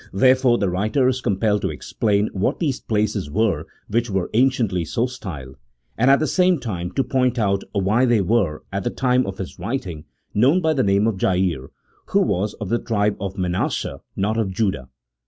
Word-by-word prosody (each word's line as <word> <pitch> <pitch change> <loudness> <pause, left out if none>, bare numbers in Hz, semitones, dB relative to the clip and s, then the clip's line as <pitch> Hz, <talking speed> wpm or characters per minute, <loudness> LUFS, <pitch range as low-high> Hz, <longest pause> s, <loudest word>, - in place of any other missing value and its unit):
There 130 +7 +5
fore 125 -2 +2
the 100 - 0
writer 110 +9 +1
is 130 0 0
compelled 105 -2 +1
to - - -1
explain 105 -1 -1
what 95 - 0
these 145 -7 -1
places 105 -6 -1
were 85 -3 0 0.2
which 115 +2 0
were 95 -3 -2
anciently 115 -7 +2
so 115 +9 -1
styled, 80 - -8 0.4
and 125 +4 +3
at 140 - +7
the 155 - 0
same 180 +4 +3
time 90 -8 -4
to 135 - +1
point 125 0 0
out 100 -3 +1
why 105 +5 +2
they 120 -3 +3
were 95 -6 +1
at 100 0 -2
the - - 0
time 125 -2 +1
of 95 -1 -5
his 95 -1 -7
writing 90 - -4 0.3
known 130 - +4
by 160 -3 +1
the 135 - +1
name 100 -1 +2
of 110 -4 0
Jair, 90 -8 0 0.4
who 200 - +2
was 100 - -1
of 105 -4 -6
the 120 - +1
tribe 105 -3 0
of 95 0 -5
Manasseh, 90 -1 -2
not 105 +3 0
of 110 -4 0
Judah. 95 - -2
105 Hz, 195 wpm, -22 LUFS, 95-125 Hz, 0.4 s, at